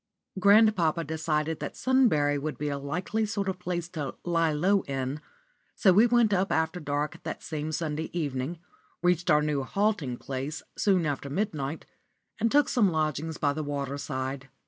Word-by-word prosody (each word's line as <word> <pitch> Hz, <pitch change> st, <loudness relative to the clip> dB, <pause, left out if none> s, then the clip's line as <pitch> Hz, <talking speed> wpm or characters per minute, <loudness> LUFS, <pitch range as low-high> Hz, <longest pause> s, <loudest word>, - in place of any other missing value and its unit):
*_ -, -, -1 dB
Grandpapa 200 Hz, -5 st, +5 dB
decided 160 Hz, 0 st, -1 dB
that -, -, -6 dB
Sunbury 155 Hz, -, +3 dB
would 150 Hz, -2 st, -4 dB
be 150 Hz, +2 st, -2 dB
a 140 Hz, -1 st, -2 dB
likely 180 Hz, +10 st, -2 dB
sort 205 Hz, -2 st, -2 dB
of 185 Hz, -1 st, -2 dB
place 175 Hz, -2 st, -3 dB
to 150 Hz, -6 st, -5 dB
"lie 165 Hz, -2 st, +2 dB
low" 190 Hz, +7 st, +2 dB
in, 135 Hz, +1 st, -3 dB, 0.5 s
so 190 Hz, -, +5 dB
we 215 Hz, +6 st, +6 dB
went 235 Hz, -3 st, +3 dB
up 190 Hz, +1 st, +1 dB
after 160 Hz, +2 st, 0 dB
dark 145 Hz, -1 st, -3 dB
that -, -, -6 dB
same 155 Hz, 0 st, -4 dB
Sunday 155 Hz, 0 st, -2 dB
evening, 145 Hz, -1 st, -2 dB, 0.5 s
reached 175 Hz, 0 st, +2 dB
our 150 Hz, -1 st, +5 dB
new 150 Hz, -2 st, 0 dB
halting 180 Hz, -, 0 dB
place 135 Hz, +5 st, -5 dB
soon 190 Hz, -5 st, +2 dB
after 145 Hz, -1 st, -2 dB
midnight, 155 Hz, -4 st, -2 dB, 0.5 s
and 230 Hz, -, +2 dB
took 290 Hz, 0 st, +4 dB
some 220 Hz, -7 st, +3 dB
lodgings 155 Hz, -1 st, -1 dB
by 145 Hz, -1 st, +1 dB
the 155 Hz, -, -3 dB
water 140 Hz, -1 st, -3 dB
side. 130 Hz, 0 st, -4 dB
160 Hz, 170 wpm, -28 LUFS, 145-185 Hz, 0.5 s, we